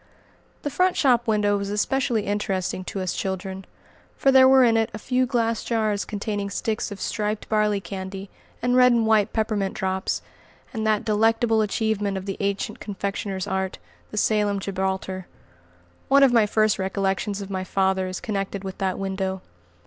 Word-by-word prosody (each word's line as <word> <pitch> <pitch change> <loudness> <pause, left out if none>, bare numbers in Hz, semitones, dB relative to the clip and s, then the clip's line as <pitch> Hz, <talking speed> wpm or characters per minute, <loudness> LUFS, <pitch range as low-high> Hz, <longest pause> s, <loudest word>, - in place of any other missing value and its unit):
The 290 - -2
front 365 +3 +2
shop 245 -4 +3
window 210 -2 +2
was 200 0 -4
especially 235 +2 0
interesting 190 -2 -2
to 195 - -4
us 185 -1 -2
children, 190 0 -4 0.5
for 270 - +4
there 260 -1 +7
were 265 -1 +7
in 230 -2 +4
it 225 -1 +2
a - - -4
few 255 +3 0
glass 230 -3 0
jars 215 -3 0
containing 205 -1 -3
sticks 215 +2 -2
of 200 -1 -8
striped 210 0 -2
barley 210 -2 +2
candy, 190 +1 -7 0.3
and 245 0 +2
red 250 0 +6
and 235 -2 +3
white 220 -1 +3
peppermint 215 -3 -1
drops, 190 0 -2 0.5
and 220 -2 -2
that 215 -1 +1
delectable 225 +1 +2
achievement 210 -2 0
of 190 - -6
the 195 -1 -4
ancient 200 0 -2
confectioner's 200 -2 -4
art, 190 0 -2 0.3
the 215 - -8
"Salem 210 -1 +2
gibraltar." 190 -1 -3 0.8
One 275 +1 +6
of 265 -3 +5
my 225 -3 +5
first 215 -1 +2
recollections 195 +1 -1
of 200 -1 -7
my 190 -1 -2
father 190 0 +1
is 185 0 -4
connected 200 -2 -3
with 190 0 -7
that 190 -1 -1
window. 190 -1 -3
205 Hz, 170 wpm, -24 LUFS, 190-225 Hz, 0.8 s, there